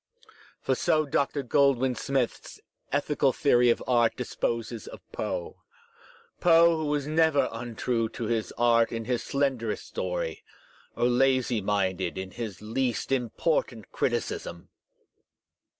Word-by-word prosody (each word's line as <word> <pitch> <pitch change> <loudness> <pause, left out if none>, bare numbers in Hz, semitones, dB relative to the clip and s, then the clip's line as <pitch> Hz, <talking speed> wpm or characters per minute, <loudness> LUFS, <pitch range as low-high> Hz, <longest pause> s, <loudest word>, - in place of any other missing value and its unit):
For - - 0
so 155 -1 +2
Dr. 140 0 0
Goldwin 130 -1 +3
Smith's 130 -1 -2 0.3
ethical 145 -1 +1
theory 125 -3 +3
of 115 - +1
art 120 -2 +3
disposes 115 -2 -3
of - - -9
Poe, - - -4 0.8
Foe 170 -1 +6
who 160 - -2
was 145 -1 0
never 155 -1 +3
untrue 115 0 -2
to - - -3
his 115 -1 -1
art 115 -1 +3
in 115 -1 -4
his 125 0 -1
slenderest 135 -6 -1
story, - - -4 0.5
or - - +1
lazy 125 -1 +2
minded 95 -2 -1
in 95 0 -5
his 105 -4 -6
least 120 +3 -2
important 125 - -1
criticism! 85 0 -3
125 Hz, 120 wpm, -27 LUFS, 115-140 Hz, 0.8 s, Foe